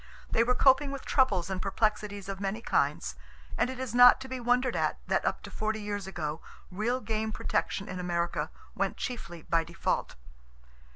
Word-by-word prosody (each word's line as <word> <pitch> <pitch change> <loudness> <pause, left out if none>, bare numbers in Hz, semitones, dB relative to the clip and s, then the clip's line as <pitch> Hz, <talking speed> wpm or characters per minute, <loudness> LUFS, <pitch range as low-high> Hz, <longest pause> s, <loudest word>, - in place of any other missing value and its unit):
They 230 - +4
were 250 +1 +2
coping 270 +2 +5
with 275 -1 -6
troubles 195 -10 +2
and 185 -1 -2
perplexities 205 -1 -1
of 195 -1 -5
many 200 +2 -2
kinds, 235 - 0 0.4
and - - +1
it 260 - -5
is 255 -3 -4
not 245 0 +8
to 265 - -6
be 260 -1 -4
wondered 245 +1 +2
at - - 0
that - - +1
up - - -1
to - - -9
forty 220 0 -2
years 205 -2 -4
ago, 160 -4 -4 0.3
real 230 +7 -1
game 220 -1 -2
protection 195 -1 -1
in 185 - -5
America 175 -1 -1 0.2
went - - -1
chiefly 175 - -5
by 165 -1 +1
default. 170 +1 -2
215 Hz, 180 wpm, -29 LUFS, 190-245 Hz, 0.4 s, not